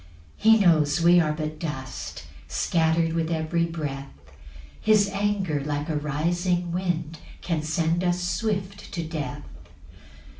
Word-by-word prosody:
6 - - -18
He - - +6
knows 160 -4 +4
we 175 +1 +6
are 155 -3 +2
but 155 0 -4
dust, 130 -6 -6 0.2
Scatter'd 165 - +1
with 165 -1 0
every 165 +1 0
breath; 145 -5 -5 0.7
His 215 -2 +4
anger, 195 -7 -1
like 145 +1 -3
a 155 - 0
rising 175 +4 0
wind, 170 -3 -2 0.2
Can 165 -3 -1
send 160 +3 0
us 175 0 +1
swift 200 +1 -2
to 170 - -2
death. 160 -2 -5
165 Hz, 135 wpm, -25 LUFS, 155-175 Hz, 0.7 s, He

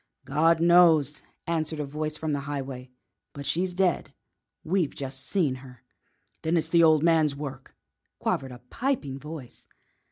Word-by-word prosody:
"God 155 +4 +3
knows," 165 -4 +5 0.2
answered 160 -2 -2
a 150 - -1
voice 150 +2 -3
from 155 -1 -2
the 145 - 0
highway. 135 -3 -5 0.4
"But 140 0 -7
she's 175 +6 0
dead 185 -2 +1 0.5
we've 175 -2 0
just 135 -1 -5
seen 170 -9 +1
her!" 125 -2 -14 0.6
"Then 160 +2 +1
it's 160 0 0
the 170 0 +5
old 155 -2 +5
man's 160 -4 +3
work," 135 -2 -8 0.4
quavered 135 -1 -1
a 125 0 -12
piping 230 - -2
voice. 150 -3 -10
150 Hz, 150 wpm, -27 LUFS, 140-165 Hz, 0.6 s, knows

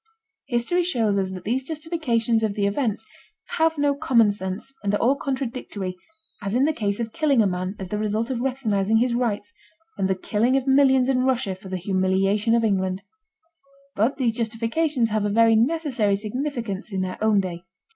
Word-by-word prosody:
History 255 +8 +1
shows 225 - +1
us 190 -1 -1
that 185 -1 -7
these 245 +5 0
justifications 295 -8 0
of 215 -2 -1
the 205 - 0
events 220 0 -1 0.5
have 320 0 +3
no 290 0 +2
common 255 -8 +3
sense 190 +6 -5
and 205 0 +1
are - - +2
all 255 +6 +3
contradictory, 255 -9 -4 0.5
as 200 +2 -3
in 260 +3 +3
the 315 - +1
case 205 -5 -2
of 230 -1 -4
killing 300 -6 +2
a 215 - +5
man 185 +1 -2
as 190 -2 -7
the 210 - -2
result 215 +3 -1
of 240 -2 -2
recognizing 225 -6 +1
his 240 +1 +2
rights, 225 -4 -2 0.5
and 190 - +2
the 190 - +2
killing 225 +7 +1
of 265 - -2
millions 265 -1 +4
in 255 -1 +2
Russia 255 -6 0
for 190 +1 -11
the 185 - -2
humiliation 195 +4 +1
of 230 - +2
England. 190 -2 0 0.9
But 230 +8 +1
these 245 -5 +1
justifications 230 +4 0
have 215 -1 0
a 205 - 0
very 225 +2 +4
necessary 245 -5 +1
significance 225 -1 -4
in 190 -1 -2
their 185 +2 -4
own 215 -2 +4
day. 175 -3 -3
225 Hz, 185 wpm, -24 LUFS, 200-265 Hz, 0.9 s, a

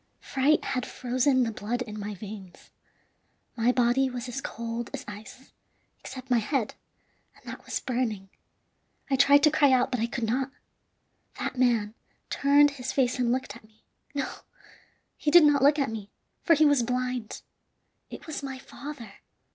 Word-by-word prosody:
"Fright 280 +3 +1
had 255 -2 -1
frozen 255 +1 +1
the 230 - -1
blood 235 +4 -3
in 215 -3 -8
my 205 0 -5
veins. 195 -2 -10 0.8
My 235 +1 +3
body 250 +2 +2
was 250 0 -5
as 245 +2 -4
cold 230 0 -5
as 280 - -8
ice, 215 +5 -11 0.5
except 260 0 -9
my 240 - +5
head, 230 0 -1 0.6
and - - -23
that - - -8
was - - -2
burning. 230 -7 -2 0.8
I - - +4
tried 280 +1 +5
to 305 - +6
cry 290 -3 +4
out, 255 -1 +3
but 250 - -1
I 230 - 0
could 235 0 -4
not. 255 +4 0 0.9
That - - -3
man 235 -4 +2 0.4
turned 285 +1 +5
his 260 -2 -5
face 255 -2 +1
and 240 -1 +2
looked 250 -4 -2
at 235 - -14
me 215 0 -25 0.3
no, 275 -2 -1 0.9
he 300 - 0
did 345 +2 +8
not 290 -2 +4
look 290 +2 +5
at 275 -6 0
me, 210 -2 -6 0.3
for 335 - +4
he 310 +1 +4
was 285 -3 +4
blind. 250 -1 -3 0.7
It - - -10
was 315 -3 -5
my 270 -1 -5
father!" 255 -5 -10
250 Hz, 170 wpm, -27 LUFS, 230-275 Hz, 0.9 s, did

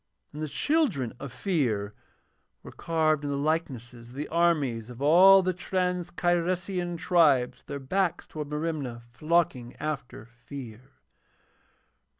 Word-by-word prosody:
And 150 - -7
the 155 - -2
children 255 - 0
of 140 - -7
Fear 120 - -1 0.7
were - - -10
carved 155 -3 0
in 145 - -2
the 140 - -1
likeness 140 -5 -2
of 120 0 -13
the 145 +3 -5
armies 150 -9 +1
of 125 0 -10
all 185 +7 +7
the 185 0 0
trans 180 0 -2
Cyresian 175 0 -1
tribes 150 -8 +3
with - - -29
their 140 - -4
backs 175 +6 -1
towards 150 -2 -7
Merimna, 150 -6 -3
flocking 155 -3 0
after 145 -7 -5
Fear. 120 -1 -10
155 Hz, 135 wpm, -27 LUFS, 125-175 Hz, 0.7 s, all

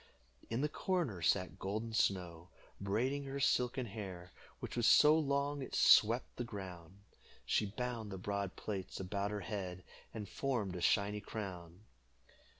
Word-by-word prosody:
In 115 +3 -1
the 150 - +2
corner 150 - -1
sat 95 +3 +1
Golden 110 +4 -3
Snow, 90 -5 0 0.3
braiding 125 +8 0
her 135 +1 -4
silken 125 -1 +2
hair, 95 -5 -7 0.3
which - - -6
was 120 -2 +3
so 150 +1 +8
long 140 -1 0
it 130 - -5
swept 115 +3 +5
the 120 - -1
ground. 95 -4 -8 0.4
She 105 - +2
bound 115 0 -4
the 95 - -4
broad 100 0 -3
plaits 100 -3 -5
about 100 +2 -2
her 105 -1 -3
head, 95 -2 -4 0.3
and 105 -2 -6
formed 110 -6 -2
a 90 - -4
shiny 100 +4 +2
crown. 95 -5 -7
105 Hz, 150 wpm, -36 LUFS, 95-125 Hz, 0.4 s, so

